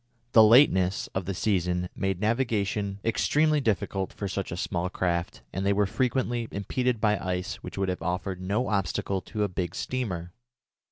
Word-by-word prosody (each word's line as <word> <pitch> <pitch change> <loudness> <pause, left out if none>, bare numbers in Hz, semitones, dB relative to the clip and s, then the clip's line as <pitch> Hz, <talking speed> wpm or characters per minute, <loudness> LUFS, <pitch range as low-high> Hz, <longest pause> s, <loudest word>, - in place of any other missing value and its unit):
The 110 - +8
lateness 105 -6 +5
of 95 -2 -2
the 100 +1 -3
season 90 -3 0
made 95 -2 -1
navigation 105 -3 0
extremely 150 +6 +2
difficult 100 -4 -1
for 100 - -4
such 95 0 -3
small 90 0 -1
craft, 85 -2 -2
and 95 - -2
they 100 +1 +3
were 105 +1 +2
frequently 120 +2 0
impeded 120 +4 -1
by 105 -2 +2
ice 90 +1 -3
which - - -9
would 95 -1 0
have 90 - -3
offered 90 +2 -2
no 105 +7 0
obstacle 100 -1 -1
to 105 +1 -3
a - - +2
big 90 -2 -3
steamer. 90 -5 -3
100 Hz, 165 wpm, -27 LUFS, 90-110 Hz, -, The